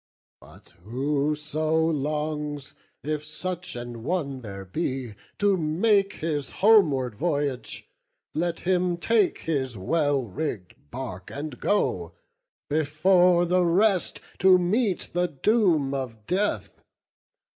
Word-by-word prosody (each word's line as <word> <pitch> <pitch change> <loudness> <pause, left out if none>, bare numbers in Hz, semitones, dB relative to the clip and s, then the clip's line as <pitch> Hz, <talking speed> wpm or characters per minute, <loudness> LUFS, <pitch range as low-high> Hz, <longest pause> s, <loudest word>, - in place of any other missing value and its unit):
But - - -17
whoso 150 - -1
longs, 150 -2 -1 0.3
if 150 0 -2
such 180 +3 -5
an 120 -1 -7
one 140 -2 -2
there 100 -4 -8
be, 130 - -3 0.2
To 205 -1 +3
make 195 +5 +2
his 150 -3 -3 0.2
homeward 150 - +5
voyage, 145 -1 -2 0.5
let 170 +1 -1
him 180 -1 +1
take 210 +1 +2
His 130 -7 -2
well 145 - +1
rigg'd 100 - -6
bark, 95 - -7
and 150 +1 -6
go; 90 - 0 0.5
before 175 +4 +3
the 180 +1 +2
rest 185 +2 +2 0.2
To 185 0 +7
meet 190 +2 0
the 175 +1 +1
doom 165 - +2
of 120 -6 -5
death! 195 - -1
155 Hz, 110 wpm, -26 LUFS, 135-180 Hz, 0.5 s, To